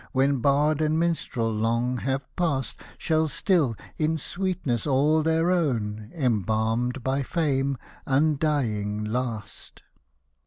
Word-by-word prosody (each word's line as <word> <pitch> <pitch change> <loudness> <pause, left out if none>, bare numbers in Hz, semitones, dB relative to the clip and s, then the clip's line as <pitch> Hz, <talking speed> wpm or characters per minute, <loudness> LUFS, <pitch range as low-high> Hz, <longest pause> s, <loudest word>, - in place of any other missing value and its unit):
When 135 0 +2
bard 145 +4 +2
and 155 0 +2
minstrel 160 -9 0
long 115 +3 0
have 135 +2 -2
past. 145 -8 -1 0.2
Shall 160 -1 +1
still, 150 - +1 0.2
in 160 +1 +1
sweetness 175 - -2
all 145 +3 +3
their 160 +2 +2
own, 110 -11 -1
Embalmed 115 - 0
by 135 +2 0
fame, 140 -2 0 0.3
undying 135 -8 +1
last. 110 -1 -4
135 Hz, 110 wpm, -26 LUFS, 115-155 Hz, 0.3 s, all